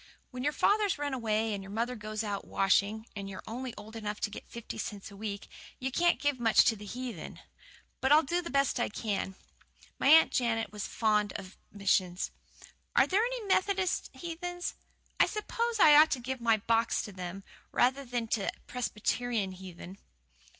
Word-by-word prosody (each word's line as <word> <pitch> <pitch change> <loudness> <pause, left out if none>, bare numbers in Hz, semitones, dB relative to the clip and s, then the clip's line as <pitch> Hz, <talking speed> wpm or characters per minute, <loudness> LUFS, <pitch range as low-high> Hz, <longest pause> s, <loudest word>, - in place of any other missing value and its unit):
When 250 -1 -5
your 295 - +2
father's 410 +3 +2
run 290 -1 -2
away, 220 -3 0
and 200 - -3
your 195 - -10
mother 230 +4 -1
goes 215 0 -4
out 205 -2 -3
washing, 200 +3 +2
and 200 -1 -5
you're 190 - -8
only 250 +3 -5
old 215 +2 -10
enough 210 -1 -4
to 210 - -1
get - - -9
fifty 235 -1 -7
cents 205 -1 -5
a - - -11
week, 200 -1 -5 0.3
you 265 +1 -3
can't 345 +5 +3
give 290 -3 0
much 225 -2 +5
to 225 - +4
the 210 0 -10
heathen. 245 -5 -6 0.6
But 265 - +1
I'll 305 +2 +7
do 345 +6 0
the 340 - -6
best 275 -2 +2
I 240 - +1
can. 205 -3 -3 0.6
My - - +2
Aunt 320 +3 +8
Jane 230 -2 +1
was 210 -1 -4
fond 210 -2 +1
of 190 -1 -8 0.2
missions. 190 -3 +1 0.6
Are - - +6
there 390 +3 +2
any - - -2
Methodist 380 -1 +1
heathen? 355 +1 -6 0.6
I - - +6
s'pose 460 +2 -2
I 300 -5 +8
ought 305 +1 +8
to 265 - -2
give 255 +1 -4
my 230 -1 +4
box 230 +2 +1
to 210 - -7
them, 185 +1 -6 0.3
rather 265 +3 +2
than 240 -2 -3
to 205 -4 0
Presbyterian 235 -3 -1
heathen." 185 0 -10
230 Hz, 185 wpm, -31 LUFS, 205-280 Hz, 0.6 s, Aunt